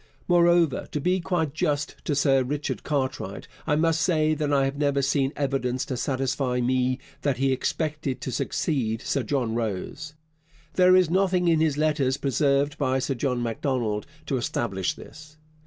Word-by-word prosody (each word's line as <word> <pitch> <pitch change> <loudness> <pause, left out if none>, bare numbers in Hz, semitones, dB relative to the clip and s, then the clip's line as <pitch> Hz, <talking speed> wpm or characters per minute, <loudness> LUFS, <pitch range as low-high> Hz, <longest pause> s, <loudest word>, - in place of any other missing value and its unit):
Moreover, 170 -4 +3
to 150 - 0
be 180 +5 +1
quite 165 -4 -1
just 145 -2 -1
to 145 - 0
Sir 135 -1 +3
Richard 145 +3 -3
Cartwright, 130 -9 -3 0.2
I 150 - +3
must 165 +1 +2
say 155 -3 +2
that 150 -1 -1
I 140 -1 +3
have 135 +1 -2
never 140 -1 +1
seen 135 0 +1
evidence 130 -3 -1
to 130 - -3
satisfy 130 0 -1
me 130 +1 +1 0.2
that 140 -3 0
he 135 +1 +2
expected 150 0 -2
to 130 - -4
succeed 120 -3 -1
Sir 140 - 0
John 120 -1 -1
Rose. 120 +8 -4 0.6
There 185 0 +6
is 180 -3 +4
nothing 185 -1 +2
in 165 -2 +4
his 155 -3 +1
letters 150 -4 +1
preserved 140 +2 +1
by 130 -2 +1
Sir 130 +1 -1
John 125 -1 -1
Macdonald 115 -3 -2 0.2
to 140 -2 -1
establish 100 -6 -2
this. 150 0 -13
140 Hz, 165 wpm, -25 LUFS, 130-155 Hz, 0.6 s, There